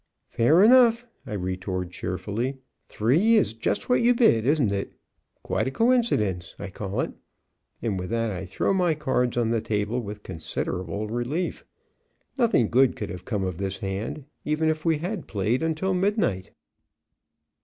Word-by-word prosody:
"Fair 155 Hz, +11 st, +4 dB
enough," 240 Hz, 0 st, +6 dB, 0.2 s
I 115 Hz, -, -5 dB
retort 95 Hz, -1 st, -3 dB
cheerfully, 105 Hz, +9 st, -3 dB, 0.3 s
"three 165 Hz, -, +3 dB
is 210 Hz, -, +2 dB
just 115 Hz, -, -2 dB
what 250 Hz, -, +3 dB
you 240 Hz, +1 st, +4 dB
bid, 120 Hz, -, +4 dB
isn't 140 Hz, -8 st, +3 dB
it? 100 Hz, -1 st, -3 dB, 0.5 s
Quite -, -, -1 dB
a -, -, +1 dB
coincidence, 135 Hz, -, +1 dB
I 100 Hz, -1 st, -7 dB
call 100 Hz, +1 st, -3 dB
it," -, -, -3 dB, 0.7 s
and 105 Hz, -5 st, -1 dB
with 90 Hz, -, -5 dB
that 115 Hz, -1 st, 0 dB
I 95 Hz, -1 st, -5 dB
throw 95 Hz, -, 0 dB
my 180 Hz, -4 st, +2 dB
cards 130 Hz, -5 st, 0 dB
on 115 Hz, -2 st, +1 dB
the 115 Hz, -1 st, +1 dB
table 105 Hz, +3 st, -1 dB
with 105 Hz, -1 st, -8 dB
considerable 90 Hz, +5 st, -4 dB
relief. 120 Hz, +10 st, -2 dB, 0.7 s
Nothing 235 Hz, -, +3 dB
good 130 Hz, +3 st, +3 dB
could -, -, -5 dB
have 90 Hz, -1 st, -8 dB
come 105 Hz, -5 st, -2 dB
of 90 Hz, -2 st, -3 dB
this 100 Hz, 0 st, -3 dB
hand, 105 Hz, +7 st, -4 dB, 0.2 s
even 155 Hz, +1 st, +1 dB
if 155 Hz, 0 st, -2 dB
we 165 Hz, -2 st, +3 dB
had 180 Hz, +4 st, -4 dB
played 105 Hz, +4 st, 0 dB
until 160 Hz, +4 st, 0 dB
midnight. 185 Hz, -, 0 dB
115 Hz, 160 wpm, -25 LUFS, 100-165 Hz, 0.7 s, enough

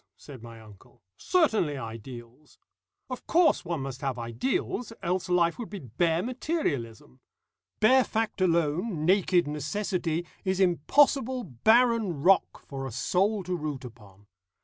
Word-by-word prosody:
said 135 Hz, -5 st, -12 dB
my 115 Hz, -1 st, -11 dB
uncle; 110 Hz, +1 st, -18 dB
"certainly 220 Hz, -, +1 dB
Ideals. 120 Hz, +3 st, -10 dB, 0.5 s
Of 255 Hz, -1 st, -8 dB
course 340 Hz, 0 st, +3 dB
one 170 Hz, -5 st, -3 dB
must 135 Hz, -1 st, -6 dB
have 135 Hz, -3 st, -2 dB
ideals, 120 Hz, -, -3 dB
else 180 Hz, +1 st, -1 dB
life 175 Hz, +1 st, +2 dB
would 235 Hz, -, -6 dB
be 205 Hz, -, -6 dB
bare 165 Hz, -, -1 dB
materialism. 160 Hz, -, -3 dB, 0.6 s
Bare 255 Hz, +4 st, +5 dB
fact 220 Hz, -4 st, -2 dB
alone, 170 Hz, 0 st, 0 dB
naked 180 Hz, -1 st, +3 dB
necessity, 170 Hz, +2 st, -2 dB, 0.2 s
is 190 Hz, -1 st, -1 dB
impossible 255 Hz, -, +2 dB
barren 215 Hz, -, +2 dB
rock 195 Hz, +1 st, +2 dB
for 135 Hz, -1 st, -6 dB
a -, -, -7 dB
soul 195 Hz, -, 0 dB
to 180 Hz, +1 st, -3 dB
root 150 Hz, -5 st, -5 dB
upon. 105 Hz, -4 st, -14 dB
170 Hz, 130 wpm, -27 LUFS, 130-210 Hz, 0.6 s, Bare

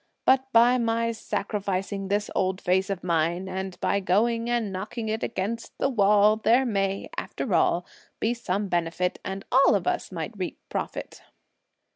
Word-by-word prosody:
But 265 Hz, 0 st, +3 dB
by 240 Hz, +2 st, +5 dB
my 230 Hz, 0 st, +1 dB
sacrificing 200 Hz, -3 st, -3 dB
this 205 Hz, +1 st, -1 dB
old 185 Hz, 0 st, 0 dB
face 190 Hz, +2 st, +1 dB
of 195 Hz, -2 st, -3 dB
mine, 170 Hz, +1 st, 0 dB
and 190 Hz, 0 st, -5 dB
by 200 Hz, -, +2 dB
going 230 Hz, +5 st, +1 dB
and 235 Hz, -4 st, 0 dB
knocking 215 Hz, +4 st, -4 dB
it 220 Hz, +1 st, -2 dB
(against 230 Hz, +3 st, -4 dB
the -, -, +1 dB
wall) 210 Hz, -2 st, +4 dB
there 230 Hz, +4 st, +3 dB
may, 195 Hz, -4 st, -1 dB
after 225 Hz, -, -3 dB
all, 170 Hz, +1 st, +2 dB, 0.3 s
be 225 Hz, +2 st, +1 dB
some 205 Hz, -3 st, -2 dB
benefit 175 Hz, 0 st, -1 dB
and 195 Hz, +1 st, -5 dB
all 265 Hz, -3 st, +5 dB
of 190 Hz, -3 st, -1 dB
us -, -, -1 dB
might 175 Hz, +5 st, -5 dB
reap 185 Hz, -3 st, -4 dB
profit." -, -, -5 dB
200 Hz, 160 wpm, -26 LUFS, 185-230 Hz, 0.3 s, by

